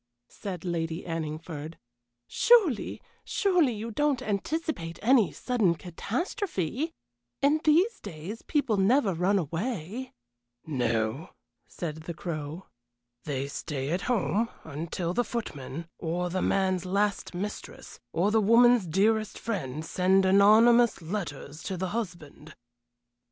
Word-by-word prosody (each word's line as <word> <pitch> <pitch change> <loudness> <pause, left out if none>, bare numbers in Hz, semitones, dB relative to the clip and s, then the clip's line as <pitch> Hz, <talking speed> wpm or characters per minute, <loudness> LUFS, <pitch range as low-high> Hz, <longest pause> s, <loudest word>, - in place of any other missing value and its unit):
said 185 -4 -7
Lady 165 -1 -2
Anningford. 160 -1 -5 0.5
"Surely, 395 - +3 0.2
surely 360 - +2
you 225 +2 -5
don't 290 +2 +1
anticipate 205 - -2
any 235 -3 +5
sudden 220 -9 +1
catastrophe? 250 - -3 0.5
In 295 +2 +4
these 350 +9 +3
days 190 +3 -7
people 275 -8 0
never 200 +1 +3
run 180 +4 +2
away 195 - -3 0.2
" 120 0 -48
"No," 120 +1 -1 0.4
said 155 -3 -5
the 160 +1 -7
Crow. 160 0 -5 0.6
"They 140 -2 -2
stay 140 0 -4
at 180 +3 0
home 230 -1 +1
until 165 +3 -4
the 245 - +2
footman, 165 - -5
or 175 +1 -2
the 185 +1 -1
man's 185 -2 +1
last 200 0 -1
mistress, 205 +4 -6
or 185 - +1
the 220 0 +4
woman's 230 -1 +5
dearest 215 +5 +1
friend, 160 - -4
send 190 +2 +3
anonymous 220 +5 +6
letters 160 -5 -5
to 190 - -4
the 185 +1 -2
husband." 175 -8 -6
190 Hz, 120 wpm, -28 LUFS, 160-230 Hz, 0.6 s, anonymous